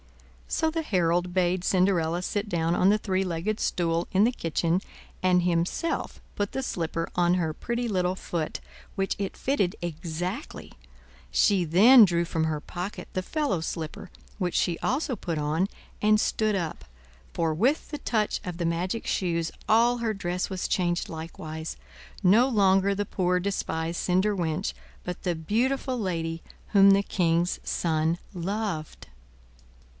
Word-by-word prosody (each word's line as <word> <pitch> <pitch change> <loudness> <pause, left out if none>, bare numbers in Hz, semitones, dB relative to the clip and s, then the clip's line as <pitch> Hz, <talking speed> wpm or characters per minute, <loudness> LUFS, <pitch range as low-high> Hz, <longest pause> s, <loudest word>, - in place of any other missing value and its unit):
So 320 - +1
the 325 +1 -1
herald 180 - +1
bade 180 0 +1
Cinderella 180 -3 +2
sit 205 +2 -2
down 170 -1 +1
on 185 +3 +4
a 210 - +4
three 190 -2 0
legged 185 +4 -2
stool 170 -1 0
in 195 +2 +4
the 240 - +3
kitchen, 170 -1 0 0.4
and 180 -1 +4
himself 175 - -1 0.2
put 205 -1 -1
the 265 - -2
slipper 165 -6 -2
on 175 0 +3
her 165 -4 0
pretty 235 +8 -3
little 185 -3 0
foot, 165 -4 -3 0.4
which 195 0 0
it 195 -1 -3
fitted 205 -10 0
exactly; 175 - -5 0.6
she 195 -4 +3
then 215 +10 +8
drew 170 -3 +2
from 160 -1 -1
her 155 -1 -1
pocket 180 +6 -6
the 185 - -1
fellow 280 - -1
slipper, 165 +2 -5 0.3
which 180 -3 -1
she 170 -2 +1
also 265 -1 0
put 170 -5 -4
on, 155 +5 0 0.3
and 215 0 +4
stood 215 -1 +1
up—for 65 - -4
with 250 - +1
the 295 - -4
touch 215 -3 0
of 180 -2 -5
the 170 - -2
magic 175 +6 -2
shoes 170 -3 0 0.2
all 235 +2 +4
her 225 -2 0
dress 180 -2 -2
was 190 -2 -2
changed 175 -2 0
likewise—no 165 +7 -1
longer 195 -3 +3
the 205 +1 -2
poor 180 -2 0
despised 170 -3 -2
cinder 190 +3 +2
wench, 160 -4 -1 0.3
but 180 0 -5
the 175 -2 0
beautiful 250 - 0
lady 165 -5 -2 0.3
whom 200 -1 +7
the 200 +1 +4
king's 175 -2 +1
son 160 0 0 0.2
loved. 185 -3 -4
180 Hz, 150 wpm, -27 LUFS, 165-205 Hz, 0.6 s, then